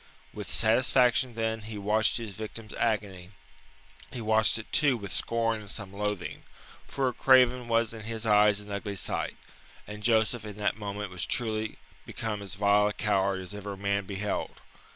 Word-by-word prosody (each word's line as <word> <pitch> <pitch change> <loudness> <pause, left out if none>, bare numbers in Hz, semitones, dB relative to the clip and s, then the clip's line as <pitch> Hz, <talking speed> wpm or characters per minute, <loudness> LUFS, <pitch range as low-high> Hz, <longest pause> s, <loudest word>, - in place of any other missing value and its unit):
With - - -7
satisfaction 125 +1 +3
then 110 0 -1
he 110 0 -7
watched 105 +2 +2
his 115 -3 -5
victim's 110 0 -7
agony; 100 -5 -1 0.8
he 125 - -6
watched 110 -1 +3
it 110 - -8
too 140 -4 +3
with 100 -4 -7
scorn 115 -1 0
and 105 - -11
some 100 -1 -4
loathing 105 -3 -3 0.5
for 135 -1 -1
a 125 - -1
craven 125 -1 +4
was 115 -1 +2
in 110 - -8
his 115 0 -3
eyes 105 -1 +5
an 105 0 -10
ugly 100 0 -4
sight, 95 - -2 0.5
and 105 0 -8
Joseph 110 0 +2
in 105 -2 -8
that 105 -1 0
moment 105 -2 -5
was 90 -2 -3
truly 110 -2 -1 0.3
become 110 -2 -4
as 100 -2 -6
vile 100 +1 +4
a 105 - -2
coward 95 -3 +1
as 90 - -7
ever 100 -1 -6
man 100 0 -1
beheld. 100 +2 -3
105 Hz, 175 wpm, -29 LUFS, 100-115 Hz, 0.8 s, eyes